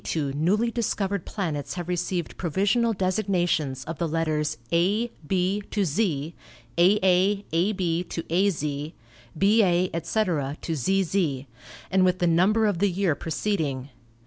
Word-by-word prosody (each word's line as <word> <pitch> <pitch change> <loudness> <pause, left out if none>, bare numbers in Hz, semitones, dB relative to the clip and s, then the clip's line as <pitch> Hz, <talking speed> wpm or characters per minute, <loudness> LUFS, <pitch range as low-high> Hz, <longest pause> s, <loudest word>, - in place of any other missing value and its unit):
Since - - -3
1892 145 -1 -1
newly 230 +2 0
discovered 200 -5 -1
planets 160 -9 -3
have 175 -2 -5
received 180 -1 -2
pro 175 - -3
visional 210 +6 +1
designations 180 -8 0
of 165 +1 -7
the 170 - 0
letters 155 -1 -1
A, 205 +8 +2 0.2
B 190 +3 +1
to 205 -2 0
Z; 165 -3 -1 0.4
AA, 190 +2 +3
AB 175 0 0
to 165 - -5
AZ; 185 -3 +2 0.7
BA, 185 -2 +3
etc., 165 -5 -1
to 165 - -3
ZZ, 165 -3 0 0.5
and 190 0 +4
with 185 0 +3
the 180 - 0
number 185 +7 +3
of 205 -5 0
the 205 +1 +3
year 185 -2 +1
preceding. 150 -4 -2
180 Hz, 140 wpm, -25 LUFS, 160-200 Hz, 0.7 s, and